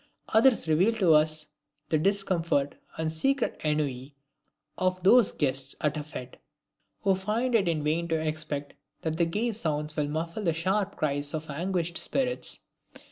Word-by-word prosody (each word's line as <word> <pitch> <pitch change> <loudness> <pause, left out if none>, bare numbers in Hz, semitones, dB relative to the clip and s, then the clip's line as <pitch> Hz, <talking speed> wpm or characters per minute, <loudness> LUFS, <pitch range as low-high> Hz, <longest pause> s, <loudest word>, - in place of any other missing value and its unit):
Others 225 -2 +4
reveal 175 +9 +3
to 185 -7 +4
us 155 0 +3 0.4
the 155 - +2
discomfort 170 -6 +1 0.2
and 160 0 -1
secret 265 - 0
ennui 145 -3 -1 0.6
of 185 0 -1
those 235 +3 +6
guests 135 -1 -1
at 150 0 0
a 150 - -3
fete, 130 -4 -8 0.7
who 195 - +4
find 215 +7 -1
it 205 -5 +3
in 160 -3 0
vain 160 +3 0
to 165 - 0
expect 155 -2 -3 0.3
that 160 -1 -2
the 170 - +3
gay 210 +8 -1
sounds 150 -7 -2
will 150 -1 0
muffle 165 +6 -3
the 170 -5 +1
sharp 190 +5 0
cries 145 0 -1
of 155 -1 -5
anguished 170 +2 -1
spirits. 255 -2 0
160 Hz, 155 wpm, -28 LUFS, 150-195 Hz, 0.7 s, those